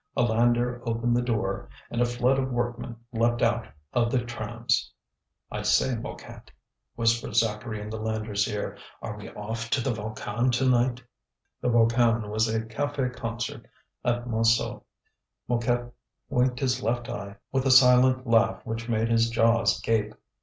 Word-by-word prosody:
A - - +4
lander 120 +1 +2
opened 115 0 0
the 120 - +2
door, 110 -5 -2 0.2
and 120 - -1
a - - +5
flood 125 +2 +1
of 130 0 -1
workmen 120 -1 -3 0.2
leapt 120 +1 +1
out 115 0 +1 0.3
of 115 -1 +2
the 120 -1 +1
trams. 120 -1 -2 0.6
"I - - -3
say, 130 - +2
Mouquet," 115 - -8 0.5
whispered 115 -2 +1
Zacharie 110 0 0
in 105 +1 -7
the 110 - -4
lander's 110 -2 -1
ear, 105 - -4 0.2
"are 105 - -4
we 105 - -9
off 115 +2 -5
to 140 - +2
the 125 +1 0
Volcan 110 +3 -2
to 130 +2 +2
night?" 125 0 +2 0.6
The - - +1
Volcan 115 -2 +3
was 110 +1 +2
a 110 0 0
café 125 +3 -2
concert 115 -1 -5 0.4
at 120 0 0
Montsou. 115 0 +1 0.7
Mouquet 120 0 0 0.4
winked 125 0 +1
his 130 -2 +1
left 120 +2 -1
eye 100 0 -6 0.2
with 135 0 +1
a - - +3
silent 130 0 +6
laugh 115 +1 +2
which 115 +1 -4
made 115 0 +1
his 115 0 +3
jaws 115 -1 +3
gape. 110 -1 0
115 Hz, 160 wpm, -27 LUFS, 115-120 Hz, 0.7 s, silent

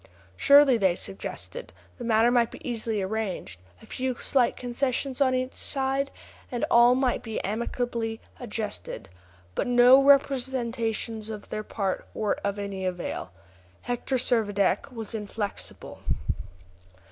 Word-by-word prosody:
Surely, 280 -3 +7
they 190 -4 +3
suggested, 340 - -7 0.3
the - - -5
matter 230 +1 +4
might 240 -2 +3
be - - -10
easily 225 -4 -2
arranged; 190 - -3 0.2
a - - -12
few 255 -1 -2
slight 250 0 +1
concessions 255 +2 -2
on 260 -2 +4
either 255 0 -1
side, 270 0 0 0.4
and 240 -2 0
all 240 +1 +7
might 255 -1 +1
be 225 -2 -4
amicably 225 +1 -2 0.2
adjusted. 215 - -5 0.4
But - - -1
no 245 +2 +7
representations 240 -5 +1
on 215 -2 -6
their 215 - -2
part 195 -3 -3
were 215 -2 0
of 200 0 -1
any 200 -2 -4
avail. 180 -2 -3 0.5
Hector 245 +2 -2
Servadac 220 -2 +1
was 225 -3 -5
inflexible. 210 -1 -5
235 Hz, 125 wpm, -27 LUFS, 215-255 Hz, 0.5 s, Surely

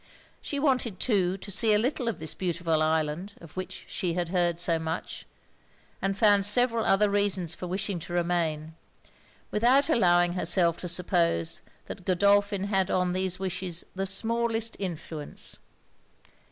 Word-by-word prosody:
She 285 - -4
wanted 255 -9 +1
too 190 -6 +1
to 200 +1 -8
see 215 +3 +4
a - - +5
little 250 +2 -1
of 230 - -1
this 160 0 -5
beautiful 170 -3 -1
island, 160 +5 -1
of 165 -3 -14
which 185 0 -6
she 175 -4 -2
had 175 -2 -1
heard 175 -2 +1
so 170 -2 +2
much; 160 +1 -5 0.7
and 195 0 -1
found 205 -1 +4
several 230 +1 +3
other 210 +2 +4
reasons 200 -4 +1
for 180 - -6
wishing 190 0 -2
to 175 - -8
remain, 165 -3 -1 0.8
without 260 +8 +3
allowing 175 - +3
herself 175 -2 +2
to 180 - -5
suppose 170 - +1 0.2
that - - -8
Godolphin 200 +1 +2
had 195 -2 0
on 180 -1 +1
these 185 -1 -1
wishes 185 -2 -3
the 195 +1 -2
smallest 230 +2 -1
influence. 165 -5 -5
185 Hz, 150 wpm, -27 LUFS, 170-205 Hz, 0.8 s, a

